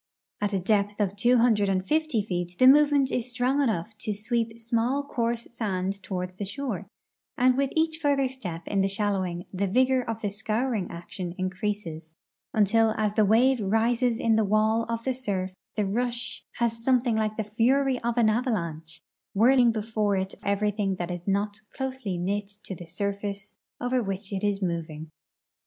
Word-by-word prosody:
At 205 0 +1
a 195 - +1
depth 205 +2 +1
of 200 -2 0
tAvo 240 +4 +4
hundred 210 -4 +3
and 185 -1 0
fift}^ 310 -8 +1
feet 175 -3 -3
the 255 - +5
movement 285 0 +6
is 245 0 -2
strong 250 +3 +1
enough 220 -5 -1
to 210 -1 -3
sweep 230 +1 -1
small, 235 +4 0
coarse 235 -4 -2
sand 195 -4 -2
toAvard 180 -1 -4
the 205 - -3
shore, 265 +8 -4 0.5
and 255 0 +5
Avith 275 +1 0
each 320 0 +1
further 280 -3 +2
step 185 -11 -6
in 200 -1 +1
the 195 - +3
shalloAving 195 -3 -1
the 195 +2 0
vigor 255 +5 +3
of 225 -2 -5
the 205 - 0
scouring 220 0 -1
action 175 +1 -6
increases 185 -4 -4 0.4
until 220 +1 +3
as 210 -2 +1
the 215 - +3
Avave 245 +5 +4
rises 230 +3 +1
in 225 -1 +3
the 220 - +3
Avail 215 +2 +2
of 230 0 -2
the 260 - 0
surf 200 -7 -2 0.2
the 210 - +1
rush 240 +4 -3
has 230 -1 -1
something 245 -2 +3
like 215 -1 -1
the 220 - 0
fury 250 +5 +2
of 235 0 -1
an 235 -2 +5
avalanche, 170 - -2 0.3
Avhirling 245 +2 +6
before 215 -2 0
it 190 0 -2
eveiything 200 -1 0
that 175 0 -3
is 175 +1 -6
not 205 +2 0 0.2
closely 260 -8 -3
knit 200 +3 -1 0.2
to - - -6
the 175 -1 -9
surface 200 +2 -4 0.2
over 250 +1 0
Avhich 195 0 -4
it 190 - -3
is 200 -1 0
moving. 160 -3 -4
215 Hz, 175 wpm, -27 LUFS, 195-245 Hz, 0.5 s, movement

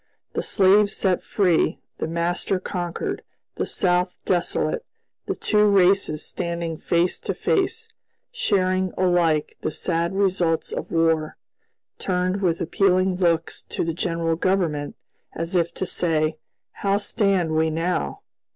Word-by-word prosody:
The - - -1
slaves 200 +1 +4
set 185 -3 +1
free, 180 -5 +1 0.2
the - - -2
master 170 +3 -1
conquered, 175 -2 -4 0.4
the - - -1
South 180 -1 +1
desolate; 185 - 0 0.4
the - - -1
two 210 -1 +2
races 190 -5 +3
standing 170 -2 -3
face 170 +1 +1
to - - -3
face, 380 -2 0 0.4
sharing 185 - +1
alike 175 -4 +1
the - - -1
sad 170 +3 -1
results 185 -4 +1
of - - -5
war, 165 -2 +1 0.6
turned 185 +1 -1
with 170 -3 +1
appealing 185 +1 +2
looks 170 -3 +1
to - - -4
the 165 - -1
general 165 -1 -1
government, 165 -5 0 0.4
as 165 +3 -3
if 170 -1 +2
to 190 - -2
say, 160 -3 0 0.3
"How 200 0 0
stand 200 -5 +1
we 160 0 +2
now?" 160 - -2
180 Hz, 130 wpm, -23 LUFS, 165-190 Hz, 0.6 s, slaves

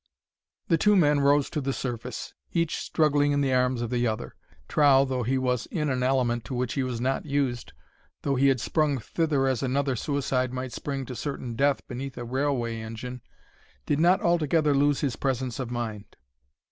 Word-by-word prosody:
The 165 -2 +3
two 210 +3 +4
men 150 -5 +4
rose 140 0 +3
to 150 - -2
the 135 0 -1
surface, 125 -1 -5 0.2
each 170 -2 0
struggling 145 -2 +2
in 145 - +1
the 135 -2 +1
arms 125 -1 +1
of 120 - -4
the 120 -1 +1
other. 110 -1 -3 0.3
Trow, 140 -2 +5
though 130 -2 -2
he 130 +3 0
was 125 -2 0
in 150 -4 -1
an 130 -1 -1
element 125 -2 +1
to 130 - -5
which 125 -1 -1
he 140 - 0
was 125 -3 -2
not 135 +5 -1
used, 135 -4 -1 0.5
though 140 - +1
he 135 +1 +3
had 135 -2 +3
sprung 150 +3 +1
thither 145 +3 0
as 130 -3 0
another 135 0 0
suicide 130 -1 -1
might 130 -1 -4
spring 135 +1 -4
to 125 - -7
certain 130 -3 -4
death 140 +2 +1
beneath 130 +1 -6
a 120 - -5
railway 125 -3 -1
engine, 115 +3 -7 0.6
did 145 - 0
not 175 +3 +4
altogether 160 -3 +2
lose 145 0 +2
his 135 -6 0
presence 130 -1 -2
of 125 -3 -3
mind. 115 -4 -5
135 Hz, 190 wpm, -27 LUFS, 125-145 Hz, 0.6 s, Trow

